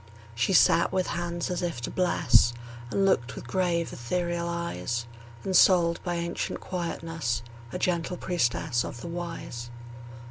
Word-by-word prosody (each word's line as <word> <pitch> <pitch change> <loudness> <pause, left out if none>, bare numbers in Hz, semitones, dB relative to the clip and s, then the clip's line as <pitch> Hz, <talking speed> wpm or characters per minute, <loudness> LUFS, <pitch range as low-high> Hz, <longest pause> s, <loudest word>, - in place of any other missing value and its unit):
She 120 +9 +1
sat 170 -1 +5
with 185 -1 +1
hands 175 +1 -2
as 180 - -1
if 170 -8 -2
to - - -4
bless, 135 -10 +4 0.4
And 195 +8 +2
looked 130 -10 +2
with - - -8
grave, 175 -3 0
ethereal 170 +6 -2
eyes; 170 -9 -2 0.4
Ensouled 180 -3 +5
by 175 -1 -1
ancient 170 0 -2
quietness, 165 -8 -3 0.3
A - - -3
gentle 175 0 0
priestess 120 -9 0
of 120 - -7
the - - -6
Wise. 165 -9 -5
170 Hz, 140 wpm, -28 LUFS, 125-175 Hz, 0.4 s, sat